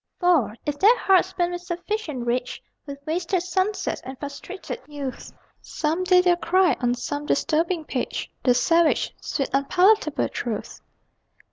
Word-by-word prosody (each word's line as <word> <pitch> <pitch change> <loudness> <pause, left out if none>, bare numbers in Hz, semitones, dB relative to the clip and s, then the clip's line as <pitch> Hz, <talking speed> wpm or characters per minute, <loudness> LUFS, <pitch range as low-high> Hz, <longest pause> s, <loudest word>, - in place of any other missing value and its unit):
For, 315 - +3
if 290 -1 -3
their 450 +5 +6
hearts 375 -1 +3
burn 350 -1 0
with 350 0 -5
sufficient 350 - -4
rage, 245 +1 -2 0.3
With 280 0 -6
wasted 345 +2 -1
sunsets 375 +3 -1
and 260 +1 -8
frustrated 285 +7 -7
youth, 285 -3 -6 0.3
Some 320 +4 -2
day 365 -1 +6
they'll 355 -1 +3
cry, 355 -3 +3
on 245 0 +1
some 290 +3 -4
disturbing 325 +3 0
page, 260 -4 -3
The 250 -2 +4
savage, 330 +4 +2
sweet, 275 - -2
unpalatable 360 +4 +3
truth! 225 -4 -5
330 Hz, 140 wpm, -24 LUFS, 280-365 Hz, 0.3 s, their